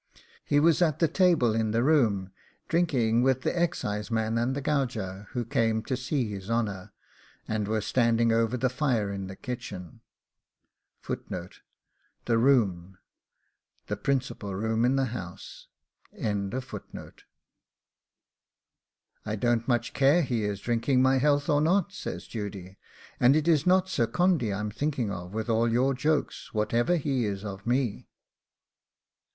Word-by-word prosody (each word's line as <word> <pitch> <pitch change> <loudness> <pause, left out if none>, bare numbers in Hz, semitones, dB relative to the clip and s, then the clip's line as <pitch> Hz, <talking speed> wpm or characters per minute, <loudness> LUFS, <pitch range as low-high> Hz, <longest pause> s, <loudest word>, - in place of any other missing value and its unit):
He 145 - +2
was 165 +2 +4
at 155 -5 +3
the 165 - +3
table 165 - +3
in 110 -1 0
the 115 +2 +1
room, 110 -11 +2 0.4
drinking 125 -9 +2
with 130 0 +2
the - - 0
excise 135 -12 -1
man 110 -1 0
and 120 +3 0
the - - -2
gauger, 115 -9 -2
who 120 -2 -2
came 115 -1 +1
up 110 - -4
to 130 - -1
see 125 0 -1
his 100 -1 -7
honour, 105 -5 -2 0.6
and 105 -2 -1
we 110 - -1
were 110 - +1
standing 115 0 +2
over 115 +2 +1
the 130 - +1
fire 125 -6 0
in 95 -1 -5
the 95 - -8
kitchen. 95 - -7 1.1
THE 115 -1 -6
ROOM 95 -8 +2 0.9
the 105 - -3
principal 115 -4 -2
room 110 +3 0
in 130 +2 +2
the 135 0 +2
house. 90 -6 -8 0.5
'I 100 -1 -2 2.8
don't 120 +1 +1
much 120 -2 0
care 140 +6 +4
is - - -4
he 105 -4 0
drinking 125 +2 +2
my 130 0 +4
health 145 +1 +2
or 145 0 +3
not,' 190 +4 +2
says - - -6
Judy; 100 -4 -7 0.4
'and 125 +3 +5
it 155 +1 +1
is 160 -1 +3
not 185 +1 +4
Sir 120 -11 0
Condy 165 - +1
I'm 105 +1 -3
thinking 130 -4 -2
of, 90 -2 -6
with 110 +1 -2
all 115 0 +2
your 130 +4 +2
jokes, 145 -2 -2
whatever 115 +9 +1
he 135 -6 0
is 100 0 -4
of 100 +1 -7
me. 120 -3 0
120 Hz, 145 wpm, -27 LUFS, 105-140 Hz, 2.8 s, and